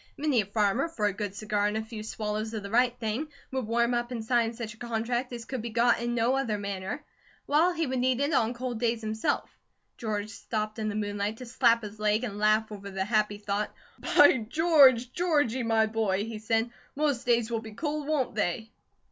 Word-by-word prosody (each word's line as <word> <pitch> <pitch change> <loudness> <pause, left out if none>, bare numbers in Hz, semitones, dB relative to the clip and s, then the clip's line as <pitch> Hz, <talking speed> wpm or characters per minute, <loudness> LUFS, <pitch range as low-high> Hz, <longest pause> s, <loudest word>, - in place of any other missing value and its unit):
Many 285 -5 +2
a 195 - -7
farmer, 210 +7 +1
for 220 -10 -2
a 205 - +2
good 200 -1 -4
cigar 210 -1 0
and 210 +1 -1
a 220 - -2
few 220 -1 -7
swallows 215 +1 -3
of 210 - -4
the 200 - -7
right 245 +1 +3
thing, 230 +6 -2 0.2
would 260 -4 -2
warm 235 +1 +2
up 240 0 -1
and 230 -3 -5
sign 235 -1 +2
such 225 -2 -6
a - - -19
contract 240 +2 -2
as 235 -2 -6
could 260 0 -4
be 235 - -4
got 235 +1 +3
in 240 0 -1
no 240 +3 +2
other 250 -6 0
manner; 200 +6 -4 0.4
while 315 +5 +3
he 330 -2 -1
would 260 -2 -2
need 255 0 +2
it 285 +2 +1
on 235 -2 +2
cold 245 -1 -4
days 230 -1 0
himself. 220 0 -1 0.5
George 215 -2 -3
stopped 215 -1 -4
in 215 -1 -1
the 205 - -4
moonlight 205 0 -2
to 255 - -8
slap 235 -1 +3
his 210 0 -8
leg 215 +2 +2
and 210 -4 -4
laugh 215 +1 +3
over 200 -1 -7
the 190 0 -2
happy 210 -1 +1
thought. 205 0 -3 0.4
"By 290 -2 +8
George, 275 -6 +5
Georgie, 290 -8 +1
my 225 -1 +3
boy," 215 -3 0
he 225 -1 -6
said, 225 +2 0 0.2
"most 285 -5 0
days 235 -1 +2
will 225 -1 -1
be 220 -1 -10
cold, 300 +2 -3
won't 295 -6 0
they?" 215 +2 -2
225 Hz, 215 wpm, -28 LUFS, 215-250 Hz, 0.5 s, By